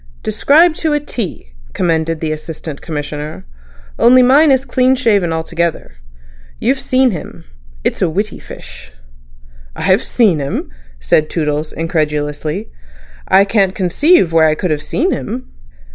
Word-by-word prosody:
"Described 315 Hz, +3 st, +3 dB
to 315 Hz, -2 st, 0 dB
a 295 Hz, -, +2 dB
T," 200 Hz, -, -6 dB, 0.2 s
commended 165 Hz, -1 st, -1 dB
the 160 Hz, -1 st, -2 dB
Assistant 155 Hz, -1 st, -7 dB
Commissioner. 150 Hz, -, -6 dB, 0.5 s
"Only 250 Hz, +2 st, +6 dB
mine 285 Hz, +5 st, +5 dB
is 265 Hz, -1 st, +2 dB
clean 260 Hz, -1 st, +2 dB
shaven 205 Hz, -9 st, +1 dB
altogether. 160 Hz, -, -3 dB, 0.6 s
You've 265 Hz, +3 st, 0 dB
seen 255 Hz, -1 st, +2 dB
him. 165 Hz, -6 st, -8 dB, 0.4 s
It's -, -, -2 dB
a 180 Hz, -, +2 dB
witty 205 Hz, +6 st, -3 dB
fish." 65 Hz, -1 st, -12 dB, 0.8 s
"I -, -, -6 dB
have 190 Hz, +2 st, +3 dB
seen 205 Hz, -10 st, +2 dB
him!" 140 Hz, -, -4 dB, 0.3 s
said 105 Hz, -, +1 dB
Toodles 150 Hz, -1 st, -2 dB
incredulously. 155 Hz, +2 st, -3 dB, 0.6 s
"I 195 Hz, +1 st, +5 dB
can't 195 Hz, -2 st, +1 dB
conceive 190 Hz, -, +2 dB
where 160 Hz, -1 st, +5 dB
I 155 Hz, -, +1 dB
could 180 Hz, 0 st, -2 dB
have 150 Hz, -1 st, -1 dB
seen 345 Hz, -, -1 dB
him." 250 Hz, -1 st, -5 dB
175 Hz, 140 wpm, -15 LUFS, 155-250 Hz, 0.8 s, Only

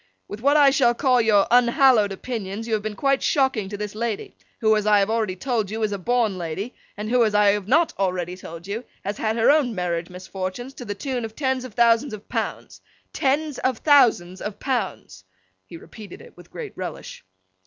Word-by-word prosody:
'With 205 Hz, -, -7 dB
what 285 Hz, +4 st, +4 dB
I 285 Hz, -2 st, +6 dB
shall 245 Hz, -3 st, +3 dB
call 255 Hz, -2 st, +3 dB
your 210 Hz, -3 st, +4 dB
unhallowed 245 Hz, -3 st, +4 dB
opinions, 215 Hz, 0 st, -5 dB
you 225 Hz, -, -2 dB
have 215 Hz, -, +1 dB
been 215 Hz, 0 st, -5 dB
quite 275 Hz, +5 st, +1 dB
shocking 265 Hz, -8 st, +1 dB
this 205 Hz, 0 st, -5 dB
lady: 220 Hz, -1 st, -4 dB, 0.2 s
who, 220 Hz, -1 st, +3 dB
as 215 Hz, 0 st, -1 dB
I 210 Hz, -1 st, +5 dB
have 200 Hz, +2 st, +1 dB
already 220 Hz, -5 st, -1 dB
told 225 Hz, -1 st, -2 dB
you, 220 Hz, +1 st, -3 dB
is 215 Hz, -, 0 dB
a 200 Hz, -, -3 dB
born 220 Hz, -2 st, 0 dB
lady, 180 Hz, +8 st, -5 dB, 0.2 s
and 210 Hz, +1 st, -4 dB
who, 250 Hz, -1 st, +4 dB
as 215 Hz, -2 st, 0 dB
I 210 Hz, -1 st, +5 dB
have 200 Hz, -1 st, 0 dB
not 320 Hz, +8 st, +3 dB
already 180 Hz, -2 st, -1 dB
told 170 Hz, -2 st, -10 dB
you, 210 Hz, +5 st, -4 dB, 0.2 s
has 205 Hz, +2 st, -4 dB
had 220 Hz, 0 st, 0 dB
her 230 Hz, +4 st, +4 dB
own 280 Hz, -7 st, +2 dB
marriage 175 Hz, -2 st, -2 dB
misfortunes 185 Hz, +7 st, -6 dB
to 245 Hz, -, -9 dB
the 205 Hz, -2 st, -4 dB
tune 255 Hz, +2 st, -3 dB
of 220 Hz, -1 st, -7 dB
tens 260 Hz, -3 st, -1 dB
of 230 Hz, -5 st, -11 dB
thousands 235 Hz, +1 st, +3 dB
of 205 Hz, -, -15 dB
pounds—tens 285 Hz, +1 st, -3 dB
of 255 Hz, -2 st, 0 dB
Thousands 225 Hz, -, +3 dB
of 210 Hz, -1 st, -6 dB
Pounds!' 230 Hz, -, -3 dB, 0.4 s
(he 170 Hz, -, -10 dB
repeated 195 Hz, +4 st, -12 dB
it -, -, -15 dB
with 175 Hz, -1 st, -16 dB
great -, -, -8 dB
relish). -, -, -7 dB
220 Hz, 205 wpm, -23 LUFS, 195-250 Hz, 0.4 s, I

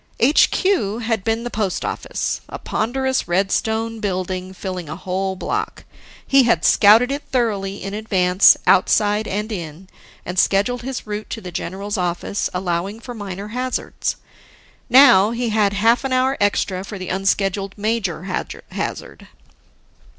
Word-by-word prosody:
HQ 285 Hz, -, +3 dB
had 225 Hz, -3 st, -1 dB
been 225 Hz, +2 st, -1 dB
the 240 Hz, -, -5 dB
post 210 Hz, -4 st, -2 dB
office, -, -, -3 dB
a -, -, -6 dB
ponderous 260 Hz, +2 st, -1 dB
red 190 Hz, +3 st, +1 dB
stone 225 Hz, 0 st, -1 dB
building 185 Hz, -2 st, -3 dB
filling 185 Hz, -3 st, -6 dB
a -, -, -5 dB
whole 190 Hz, +2 st, -3 dB
block. -, -, -4 dB, 0.4 s
He 275 Hz, 0 st, +5 dB
had 240 Hz, -2 st, +2 dB
scouted 225 Hz, +5 st, +6 dB
it 285 Hz, +1 st, -2 dB
thoroughly 205 Hz, -6 st, -1 dB
in 195 Hz, +1 st, -5 dB
advance, 190 Hz, -3 st, +4 dB
outside 205 Hz, +3 st, +3 dB
and 210 Hz, +3 st, -3 dB
in, 175 Hz, -1 st, -7 dB, 0.4 s
and 180 Hz, +1 st, -2 dB
scheduled 215 Hz, +7 st, +2 dB
his 260 Hz, +1 st, -5 dB
route 210 Hz, 0 st, -5 dB
to -, -, -5 dB
the 185 Hz, -4 st, -8 dB
general's 195 Hz, +4 st, -4 dB
office, 175 Hz, +3 st, -2 dB
allowing 180 Hz, +3 st, -2 dB
for 245 Hz, +1 st, -8 dB
minor 200 Hz, -2 st, -7 dB
hazards. 250 Hz, +3 st, -3 dB, 0.7 s
Now, 245 Hz, -6 st, +7 dB
he 235 Hz, +1 st, -2 dB
had 210 Hz, -2 st, +2 dB
half 225 Hz, +5 st, +3 dB
an 265 Hz, -1 st, -1 dB
hour 260 Hz, +1 st, +2 dB
extra 195 Hz, -2 st, 0 dB
for 200 Hz, +1 st, -7 dB
the 185 Hz, -1 st, -6 dB
unscheduled 195 Hz, +1 st, -1 dB
major 205 Hz, -6 st, -2 dB
hazard. 185 Hz, -1 st, -5 dB
205 Hz, 145 wpm, -20 LUFS, 190-230 Hz, 0.7 s, Now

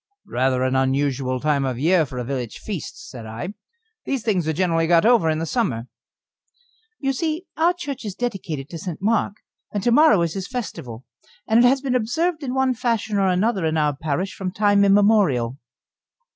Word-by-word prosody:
"Rather 130 Hz, +1 st, 0 dB
an 130 Hz, 0 st, 0 dB
unusual 130 Hz, -1 st, 0 dB
time 145 Hz, 0 st, +1 dB
of 130 Hz, -2 st, -1 dB
the 125 Hz, -, -5 dB
year 165 Hz, -2 st, +3 dB
for 130 Hz, -, -8 dB
a 125 Hz, -, -2 dB
village 125 Hz, -2 st, -4 dB
feast," 215 Hz, -, -7 dB
said 110 Hz, -, -9 dB
I. 115 Hz, -, -6 dB, 0.5 s
"These 270 Hz, -4 st, -2 dB
things 190 Hz, -8 st, 0 dB
are -, -, +2 dB
generally 165 Hz, -1 st, +1 dB
got 170 Hz, +1 st, +4 dB
over 225 Hz, -8 st, +4 dB
in 155 Hz, -, +1 dB
the 165 Hz, -, -2 dB
summer." 130 Hz, -, -1 dB, 1.1 s
"You 270 Hz, -1 st, 0 dB
see, 320 Hz, +4 st, -2 dB
our 335 Hz, +3 st, +3 dB
church 290 Hz, -8 st, -6 dB
is 205 Hz, -4 st, -5 dB
dedicated 185 Hz, -, -4 dB
to 165 Hz, -, -6 dB
St. 180 Hz, -4 st, -6 dB
Mark, 210 Hz, 0 st, +1 dB, 0.4 s
and 205 Hz, -2 st, -3 dB
to 240 Hz, -, +2 dB
morrow 290 Hz, -, +5 dB
is 165 Hz, -1 st, -2 dB
his 195 Hz, -1 st, -4 dB
festival, 135 Hz, -, -6 dB, 0.4 s
and 230 Hz, +2 st, +5 dB
it -, -, +7 dB
has 265 Hz, +1 st, +2 dB
been 270 Hz, -2 st, -1 dB
observed 310 Hz, +8 st, 0 dB
in 260 Hz, -2 st, -3 dB
one 265 Hz, -1 st, +2 dB
fashion 225 Hz, -4 st, -1 dB
or 195 Hz, -, +3 dB
another 190 Hz, +2 st, +1 dB
in 160 Hz, 0 st, 0 dB
our 150 Hz, -2 st, +1 dB
parish 160 Hz, +6 st, -2 dB
from 190 Hz, -1 st, -4 dB
time 205 Hz, +1 st, +3 dB
immemorial. 195 Hz, -, +3 dB
190 Hz, 195 wpm, -22 LUFS, 145-235 Hz, 1.1 s, it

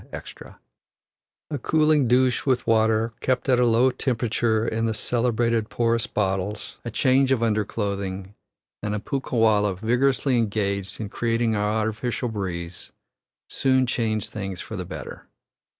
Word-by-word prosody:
A 145 Hz, -, -2 dB
cooling 155 Hz, 0 st, +3 dB
douche 125 Hz, +1 st, +3 dB
with 130 Hz, -3 st, +1 dB
water 110 Hz, 0 st, +2 dB
kept 130 Hz, 0 st, -1 dB
at 125 Hz, -2 st, +4 dB
a 125 Hz, -, +4 dB
low 120 Hz, +3 st, +4 dB
temperature 115 Hz, -3 st, 0 dB
in 115 Hz, +1 st, 0 dB
the 110 Hz, -, -1 dB
celebrated 115 Hz, -1 st, 0 dB
porous 115 Hz, -1 st, 0 dB
bottles, 95 Hz, +1 st, -2 dB
a 120 Hz, -, -4 dB
change 130 Hz, +3 st, +2 dB
of 125 Hz, -3 st, +2 dB
underclothing, 100 Hz, -3 st, -2 dB, 0.5 s
and 105 Hz, 0 st, -2 dB
a -, -, -2 dB
punkah 135 Hz, +2 st, -3 dB
wallah 105 Hz, -3 st, +3 dB
vigorously 125 Hz, +4 st, +1 dB
engaged 100 Hz, -3 st, -2 dB
in 105 Hz, -2 st, -4 dB
creating 115 Hz, +1 st, 0 dB
an 105 Hz, -, 0 dB
artificial 110 Hz, +3 st, -1 dB
breeze, 90 Hz, -5 st, -5 dB, 0.6 s
soon 130 Hz, -1 st, +2 dB
change 110 Hz, -3 st, -1 dB
things 95 Hz, -4 st, -5 dB
for 110 Hz, -, -7 dB
the 90 Hz, -2 st, -4 dB
better. -, -, -8 dB
115 Hz, 135 wpm, -24 LUFS, 105-125 Hz, 0.6 s, at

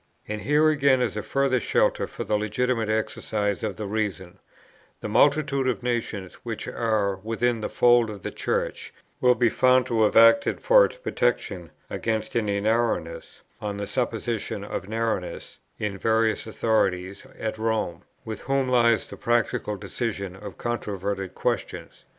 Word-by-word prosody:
And 105 Hz, 0 st, -4 dB
here 150 Hz, +8 st, +3 dB
again 140 Hz, -3 st, +3 dB
is 120 Hz, -4 st, -1 dB
a 105 Hz, -, -2 dB
further 135 Hz, +2 st, +1 dB
shelter -, -, +1 dB
for -, -, -6 dB
the 105 Hz, -, 0 dB
legitimate 110 Hz, +2 st, 0 dB
exercise 105 Hz, -2 st, -1 dB
of 105 Hz, -3 st, -3 dB
the 105 Hz, -, -5 dB
reason: 100 Hz, -4 st, -3 dB, 0.6 s
the -, -, -5 dB
multitude 140 Hz, -3 st, +3 dB
of 125 Hz, 0 st, -3 dB
nations 115 Hz, -6 st, -2 dB
which -, -, -5 dB
are 105 Hz, -4 st, 0 dB
within 115 Hz, +3 st, -1 dB
the -, -, -3 dB
fold 120 Hz, -2 st, +4 dB
of 100 Hz, -3 st, -8 dB
the -, -, -4 dB
Church -, -, -2 dB, 0.3 s
will 125 Hz, -1 st, +4 dB
be 120 Hz, -, +3 dB
found 130 Hz, +2 st, +4 dB
to 115 Hz, -3 st, 0 dB
have 105 Hz, -, +3 dB
acted 115 Hz, +12 st, +6 dB
for -, -, +6 dB
its -, -, -6 dB
protection, 120 Hz, -, -1 dB, 0.2 s
against 110 Hz, -1 st, -3 dB
any 105 Hz, -3 st, +1 dB
narrowness, 105 Hz, -7 st, -1 dB, 0.2 s
on 105 Hz, -1 st, -3 dB
the 100 Hz, -, -3 dB
supposition 115 Hz, 0 st, -2 dB
of 95 Hz, -, -5 dB
narrowness, 110 Hz, -5 st, -3 dB, 0.2 s
in 105 Hz, -2 st, -2 dB
the 100 Hz, -, -9 dB
various 110 Hz, +1 st, +1 dB
authorities 100 Hz, -2 st, 0 dB
at 110 Hz, -1 st, -4 dB
Rome, 110 Hz, -6 st, -1 dB, 0.2 s
with 110 Hz, -1 st, -5 dB
whom 135 Hz, -1 st, 0 dB
lies 115 Hz, -2 st, +3 dB
the -, -, -9 dB
practical 115 Hz, -3 st, 0 dB
decision 100 Hz, -1 st, -4 dB
of 100 Hz, 0 st, -9 dB
controverted 100 Hz, -5 st, -3 dB
questions. -, -, -3 dB
110 Hz, 155 wpm, -25 LUFS, 100-120 Hz, 0.6 s, acted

